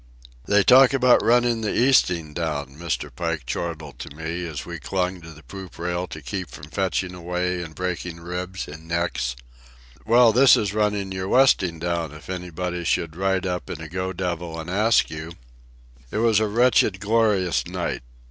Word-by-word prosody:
"They 100 0 +4
talk 130 +3 +7
about 125 -2 +4
running 120 -1 +3
the 105 - -1
easting 90 - +3
down," 75 -5 -3
Mr. 75 -5 -4
Pike 80 -3 -3
chortled 80 0 -5
to 70 - -8
me, 85 +3 -4
as 75 -3 -6
we 85 -1 -7
clung 90 +3 -2
to 85 - -11
the 75 -1 -13
poop 95 +7 -10
rail 90 +1 -2
to 80 -3 -9
keep 90 +5 -4
from 75 +4 -11
fetching 95 -1 -1
away 90 0 -2
and 80 -3 -8
breaking 90 -2 -4
ribs 90 +2 -5
and 80 +2 -11
necks. 85 -8 -1 0.7
"Well, 115 0 +5
this 130 +3 +7
is 100 -2 -1
running 105 -2 0
your 95 0 -3
westing 95 -9 +4
down 85 -2 -2
if 75 +4 -9
anybody 90 -1 -4
should 85 -2 -1
ride 95 0 0
up 90 -1 -3
in 80 - -5
a 80 - -7
go 90 +3 -3
devil 85 -2 -4
and 80 +2 -6
ask 110 +4 +3
you." 80 +1 -7 0.8
It - - -4
was 110 -1 +3
a 110 - +1
wretched, 110 -3 +3
glorious 105 -4 +1
night. - - -3
90 Hz, 175 wpm, -23 LUFS, 80-100 Hz, 0.8 s, talk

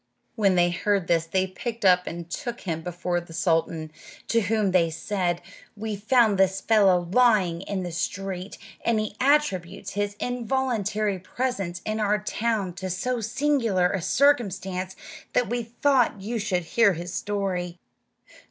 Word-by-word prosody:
When 200 -4 +3
they 175 0 +3
heard 195 +1 0
this 165 -1 +1
they 190 +2 +1
picked 230 +5 -6
him 190 - +8
up 180 0 +1
and 170 0 -5
took 240 +6 -5
him 165 -4 -3
before 175 +1 -2
the 170 -1 -13
sultan, 160 -2 0 0.4
to 230 - +3
whom 210 -1 +1
they 175 -3 +3
said, 175 0 -2 0.3
"We 215 0 -3
found 215 -1 +3
this 190 0 +3
fellow 190 -5 +3
lying 205 -8 +3
in 195 -1 -3
the 175 - -4
street, 185 +2 -4 0.3
and 230 -2 +2
he 215 -1 -3
attributes 200 - +1
his 205 0 -2
involuntary 230 -5 -1
presence 190 -4 -3
in 215 0 -2
our 210 0 +2
town 210 -2 -1
to 185 +1 -4
so 235 +7 -2
singular 225 -6 +1
a 190 - -1
circumstance 190 - +1 0.4
that 245 - +2
we 240 0 0
thought 240 0 +1
you 225 +4 -3
should 190 -4 -1
hear 200 +4 +3
his 175 +2 -6
story." 185 -4 -2
195 Hz, 155 wpm, -25 LUFS, 180-225 Hz, 0.4 s, him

